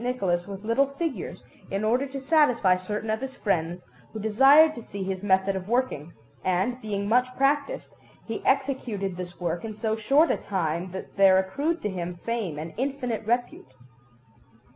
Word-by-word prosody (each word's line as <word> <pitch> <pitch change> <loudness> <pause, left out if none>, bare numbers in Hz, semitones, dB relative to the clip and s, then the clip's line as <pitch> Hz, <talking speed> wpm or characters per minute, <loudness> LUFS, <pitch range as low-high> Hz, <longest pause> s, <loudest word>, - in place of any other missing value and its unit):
Nicholas 195 -8 -1
with 200 0 -7
little 230 +5 +3
figures, 335 -2 -4 0.3
in 195 +2 -2
order 245 +6 +2
to 275 +1 -6
satisfy 265 - +4
certain 210 +4 -3
of 220 - -1
his 265 0 -5
friends, 175 -5 -1 0.3
who 220 - -6
desired 270 +9 +6
to 235 - -8
see 200 -3 -6
his 190 -1 -3
method 195 -1 +2
of 190 +1 -5
working; 235 - 0 0.3
and, 190 +8 0
being 200 -2 -3
much 250 +3 +3
practised, 290 - 0 0.3
he 225 - -5
executed 255 -8 0
this 175 -1 -7
work 170 -1 -2
in 220 -1 -5
so 220 0 -1
short 275 +9 +3
a - - +1
time 175 -2 -2
that 190 +1 -8
there 195 -1 +6
accrued 280 - -1
to - - +1
him 180 -1 -4
fame 225 -10 -2
and 160 +2 -6
infinite 255 -3 -2
repute. 240 - -2
215 Hz, 170 wpm, -26 LUFS, 185-255 Hz, 0.3 s, desired